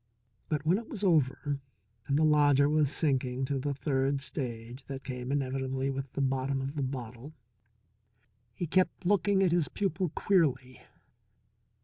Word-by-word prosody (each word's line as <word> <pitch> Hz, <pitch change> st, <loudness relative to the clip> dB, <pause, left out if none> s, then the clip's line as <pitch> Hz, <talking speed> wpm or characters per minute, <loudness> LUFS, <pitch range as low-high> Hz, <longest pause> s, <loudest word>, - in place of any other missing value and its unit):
But 150 Hz, -1 st, -1 dB
when 180 Hz, +6 st, +3 dB
it 230 Hz, -, -11 dB
was 210 Hz, -3 st, -5 dB
over 145 Hz, -4 st, +1 dB, 0.5 s
and 140 Hz, -, +2 dB
the 155 Hz, -, +3 dB
lodger 145 Hz, -2 st, +5 dB
was 150 Hz, -2 st, +2 dB
sinking 135 Hz, -4 st, 0 dB
to 140 Hz, 0 st, -1 dB
the 145 Hz, +2 st, -2 dB
third 135 Hz, -1 st, 0 dB
stage 125 Hz, -2 st, -5 dB
that 135 Hz, -1 st, -7 dB
came 125 Hz, 0 st, -5 dB
inevitably 135 Hz, -1 st, -1 dB
with 135 Hz, -1 st, -5 dB
the -, -, -2 dB
bottom 135 Hz, +1 st, 0 dB
of 135 Hz, +1 st, -4 dB
the 150 Hz, -, -3 dB
bottle, 130 Hz, +2 st, -6 dB, 1.2 s
he 175 Hz, -, -3 dB
kept 185 Hz, +2 st, +1 dB
looking 200 Hz, 0 st, +3 dB
at 180 Hz, -, +3 dB
his 170 Hz, -4 st, +2 dB
pupil 190 Hz, 0 st, -1 dB
queerly. 135 Hz, -9 st, +1 dB
140 Hz, 150 wpm, -30 LUFS, 130-155 Hz, 1.2 s, lodger